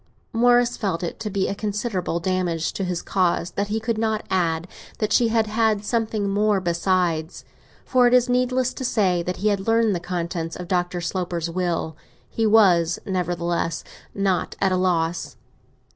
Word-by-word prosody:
Morris 245 +1 +3
felt 185 -6 -2
it 170 - -4
to 215 - -3
be 195 -1 0
a - - -1
considerable 200 -4 -2
damage 175 -2 -1
to 195 - -3
his 180 -2 -2
cause 180 -2 0
that 200 +1 -2
he 215 +2 -1
could 220 0 -2
not 220 -1 -1
add 170 -2 0 0.3
that 215 -1 -1
she 240 - +4
had 225 -1 +2
had 215 -1 +1
something 220 -3 -1
more 205 0 +2
besides; 170 -2 -1 0.4
for 250 -1 +4
it 240 - +2
is 250 0 +4
needless 250 0 +1
to - - -6
say 190 -8 +1
that 180 +1 -3
he 210 +3 +1
had 200 0 -1
learnt 225 -2 +3
the 175 - -1
contents 170 -2 -4
of 180 - -7
Dr. 175 -1 -1
Sloper's 170 -1 -2
will. 170 -3 -2 0.3
He 225 -1 0
was 180 -6 +4
nevertheless 175 -2 -1 0.3
not 195 -2 0
at 195 -1 +2
a - - +2
loss. 175 -2 0
190 Hz, 175 wpm, -23 LUFS, 175-220 Hz, 0.4 s, she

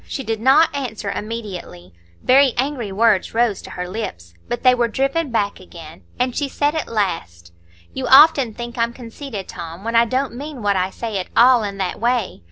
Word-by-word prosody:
She 270 - -5
did 225 -2 -3
not 275 +7 +5
answer 220 -7 -4
immediately; 200 - -7 0.3
very 265 0 +5
angry 255 -5 -2
words 215 0 +2
rose 230 -3 +1
to - - -11
her 180 0 -5
lips, 85 - -6
but 240 - -4
they 255 -1 +6
were 240 -1 +1
driven 275 +6 -1
back 210 -4 -1
again, 165 -3 -12 0.2
and 250 0 0
she 285 -2 -1
said 290 +2 0
at 315 - -3
last: 165 - -3 0.4
"You 260 -1 -3
often 270 -5 +6
think 240 0 -7
I'm 230 0 0
conceited, 235 -3 -8
Tom, 170 +3 -8
when 230 +1 -3
I 230 0 +6
don't 260 +2 -1
mean 275 -1 -7
what 200 -1 +2
I 185 0 0
say 220 0 -4
at 180 - -5
all 245 0 +6
in 200 -2 -4
that 190 -2 -3
way. 235 -3 -1
230 Hz, 195 wpm, -20 LUFS, 195-260 Hz, 0.4 s, they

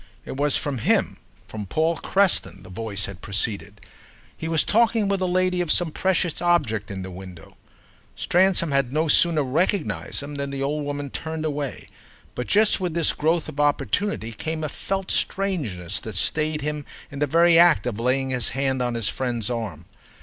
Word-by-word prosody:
It - - -6
was 145 +1 +2
from 140 -4 -2
him, - - +1 0.3
from 105 -2 -6
Paul 160 - +1
Creston, 195 - 0
the 90 - -12
voice 100 0 -3
had 95 -2 -9
proceeded: 100 0 -2 0.5
he 160 - -5
was 160 -2 +2
talking 225 -1 +2
with 200 -1 +1
the 185 - 0
lady 185 0 +1
of 170 -3 -1
some 175 -3 +1
precious 180 -2 0
object 135 - +1
in 95 -2 -5
the 95 - -7
window. 90 -2 -11 0.6
Stransom 180 -3 +3
had 140 -3 +1
no 155 +3 +1
sooner 160 0 +4
recognised 130 - -1
him 145 +1 -7
than 140 - -3
the 135 0 -3
old 145 +1 -1
woman 145 -1 -4
turned 160 -1 -4
away; 145 -4 -3 0.5
but 125 - -4
just 210 +1 +4
with 180 -3 -2
this 170 -2 +2
growth 160 +2 0
of 140 - -8
opportunity 145 - 0
came 155 +8 -4
a 155 - -2
felt 195 +5 -3
strangeness 140 - -1
that - - -7
stayed 155 -1 +1
him 150 0 -2 0.3
in 140 - -7
the 145 - +1
very 170 +3 +5
act 170 -6 +5
of 115 -3 -3
laying 130 +2 0
his 125 -4 0
hand 135 -1 0
on 120 -1 -1
his 115 -3 -1
friend's 120 -1 -2
arm. 100 -9 -4
145 Hz, 185 wpm, -24 LUFS, 115-170 Hz, 0.6 s, very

